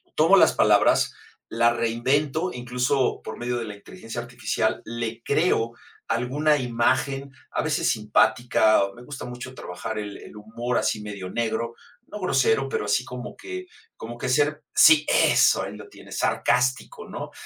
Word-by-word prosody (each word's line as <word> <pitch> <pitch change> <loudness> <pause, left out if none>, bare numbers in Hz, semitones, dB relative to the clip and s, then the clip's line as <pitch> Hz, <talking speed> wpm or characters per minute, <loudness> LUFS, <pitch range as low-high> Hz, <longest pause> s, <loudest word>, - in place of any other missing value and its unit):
Tomo - - +5
las - - +5
palabras, - - +3 0.4
la 120 0 +3
reinvento, 135 +9 0
incluso 125 +2 -1
por - - -8
medio 120 0 -2
de 115 - -3
la 105 -1 -7
inteligencia 115 - -8
artificial, 120 +1 -2
le 115 0 -5
creo 130 -7 +1 0.3
alguna 145 +6 +1
imagen, 130 +3 0 0.2
a - - -1
veces 155 -1 0
simpática, 110 0 +3
me 120 - -13
gusta 140 +1 -8
mucho 125 +1 -8
trabajar 105 +5 -6
el 105 -1 -5
el - - -13
humor 115 +3 -3
así 110 - 0
medio 100 -3 -7
negro, 115 +1 -2 0.3
no 210 - -8
grosero, 135 - +2
pero 105 - -2
así 105 +4 +1
como 125 -1 -8
que 370 0 -7 0.3
como 120 +1 -8
que 130 - -4
ser 145 +3 +1
sí, 155 -1 +7
eso, - - +4
ahí - - -6
lo - - -11
tienes, - - -10
sarcástico, 130 - 0
¿no? - - -7
120 Hz, 155 wpm, -24 LUFS, 115-140 Hz, 0.4 s, sí